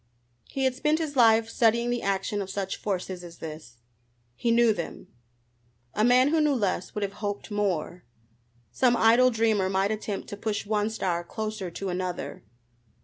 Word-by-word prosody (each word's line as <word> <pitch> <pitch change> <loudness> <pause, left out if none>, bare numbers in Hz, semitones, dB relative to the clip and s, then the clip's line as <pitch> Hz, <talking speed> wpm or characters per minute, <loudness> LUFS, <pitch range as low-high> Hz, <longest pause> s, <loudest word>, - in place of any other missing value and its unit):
He 270 - -2
had 260 -1 +2
spent 300 +4 +1
his 310 -3 -3
life 225 -2 +5
studying 235 +1 +2
the 245 - -1
action 200 +1 -1
of 195 - -5
such 195 -1 -3
forces 185 -2 -3
as 170 -1 -11
this. 155 -6 -9 0.6
He 235 - -1
knew 230 -1 +5
them! 170 -4 -7 0.8
A 215 - +1
man 250 +3 +5
who 320 +1 +2
knew 300 -2 +3
less 195 -5 -1
would 210 - -1
have 200 0 -3
hoped 205 +1 -4
more. 185 -4 -1 0.7
Some 245 -2 +3
idle 235 +3 +5
dreamer 220 -5 +1
might 195 +2 +1
attempt 210 -2 -4
to - - -5
push 210 0 -2
one 210 0 0
star 180 -6 -2
closer 215 0 -4
to 190 +3 -5
another. 180 0 -4
210 Hz, 170 wpm, -27 LUFS, 190-235 Hz, 0.8 s, life